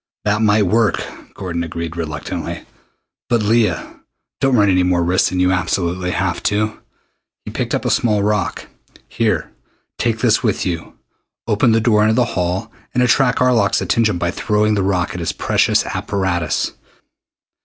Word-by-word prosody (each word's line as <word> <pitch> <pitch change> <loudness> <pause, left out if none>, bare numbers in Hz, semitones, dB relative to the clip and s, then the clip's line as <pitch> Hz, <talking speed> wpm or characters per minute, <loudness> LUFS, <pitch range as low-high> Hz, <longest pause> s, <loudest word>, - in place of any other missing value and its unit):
"That 105 +1 +1
might 105 -1 +4
work," 110 +2 +1 0.3
Gordon 85 -3 -3
agreed 85 0 -5
reluctantly. 75 -3 -5 0.6
"But, 120 -3 +2
Leah, 110 +1 0 0.4
don't 135 -1 +2
run 105 -3 +4
any 90 -1 +3
more 90 -1 +2
risks 90 +2 +2
than 90 - -2
you 90 0 +3
absolutely 90 0 -1
have 90 -1 -1
to!" 105 +1 -1 0.7
He - - -6
picked - - -2
up - - -3
a - - +1
small 105 -4 +2
rock. 105 -1 -1 0.4
"Here, - - -1 0.5
take 115 -2 0
this 115 -2 +2
with 110 -6 0
you. 85 -3 -4 0.5
Open 115 +2 +3
the 115 - +4
door 110 -2 +3
into 110 +1 +3
the 125 0 +3
hall 90 +5 -2 0.2
and 125 - +3
attract 125 +1 +3
Arlok's 120 -6 +3
attention 110 -5 +1
by 85 0 -1
throwing 105 +2 +1
the 100 - +1
rock 95 -2 0
at 90 - -5
his 85 - -2
precious - - +1
apparatus. 90 -5 -1
100 Hz, 160 wpm, -18 LUFS, 90-110 Hz, 0.7 s, might